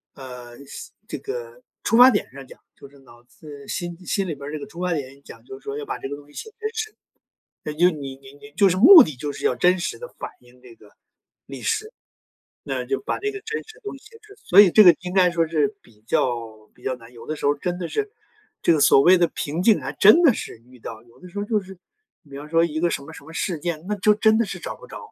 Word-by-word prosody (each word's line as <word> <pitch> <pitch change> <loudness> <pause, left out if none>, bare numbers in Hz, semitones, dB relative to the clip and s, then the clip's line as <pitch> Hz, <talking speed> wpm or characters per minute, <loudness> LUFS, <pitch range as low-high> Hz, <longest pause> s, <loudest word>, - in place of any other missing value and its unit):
呃， 125 -2 -11
心 - - -10
这 - - -5
个 475 +3 -7 0.2
出 225 - +2
发 250 +2 +9
点 205 - -1
上 135 0 -11
讲， - - -15 0.2
就 140 - -14
是 140 -1 -20
脑 120 -2 -19
子 140 +2 -13
心 175 -2 -5
心 195 -2 -1
里 160 - -4
边 140 0 -9
儿 - - -7
这 155 - -4
个 - - -8
出 170 - -12
发 180 -1 0
点 140 -2 -6
讲， - - -14
就 400 0 -10
说 425 +1 -6
要 440 - -6
把 - - -4
这 - - -5
个 145 - -4
东 145 0 -15
西 145 - -21
写 440 - -8
真 435 - -3
实， 435 -1 -5 0.7
那 150 - -4
就 175 +4 +3
你 140 -4 -7
你 135 +1 -16
你 215 +9 -15
就 200 -2 +5
是 180 - 0
目 320 - +10
的 155 - -7
就 145 +3 -5
是 - - -9
要 125 - +2
真 180 +6 +3
实 - - -4
地 485 - -9
反 - - -6
映 125 0 -22
这 120 -2 -15
个 105 - -20 0.6
历 - - -9
史。 435 -1 -2 0.8
那 - - -3
就 405 - -1
把 - - -3
这 415 - -2
个 405 0 -9
真 450 +1 -4
实 440 - -15
的 - - -20
东 410 - -6
西 - - -25
写 455 - -16
出 425 -1 -17
来， 420 - -19
所 185 - +2
以 200 -4 +9
这 215 +2 +7
个 175 -3 +8
应 180 0 -6
该 185 -2 +4
说 165 -1 0
是 160 +6 0
比 110 -3 -23
较 115 -4 -2
比 - - -23
较 130 - -2
难。 115 0 -16
有 115 - -13
的 155 - -4
时 - - -10
候 145 +1 +3
真 175 +4 -4
的 175 -2 -5
是 420 - -3 0.5
这 - - +4
个 155 - +1
所 135 - +6
谓 180 +2 +6
的 170 - +3
瓶 155 +5 -4
颈 220 0 +3
还 - - -5
真 215 - +6
的 315 -7 +6
是 215 - -7
遇 125 - -17
到， 110 -1 -9
有 120 0 -23
的 180 - -12
时 180 - -8
候 205 - -2
就 215 0 0
是 190 -1 -13 0.4
比 140 -4 -11
方 150 +1 -9
说 165 +1 +3
一 155 -1 -3
个 175 - +2
什 145 - -3
么 160 +3 -12
什 - - -12
么 160 +3 -13
事 170 -2 -2
件， 165 0 -4
那 210 - -1
就 210 +2 +3
真 220 +1 +3
的 230 - +1
是 - - -6
找 - - -7
不 - - -14
着。 - - -11
170 Hz, 305 characters per minute, -22 LUFS, 140-215 Hz, 0.8 s, 目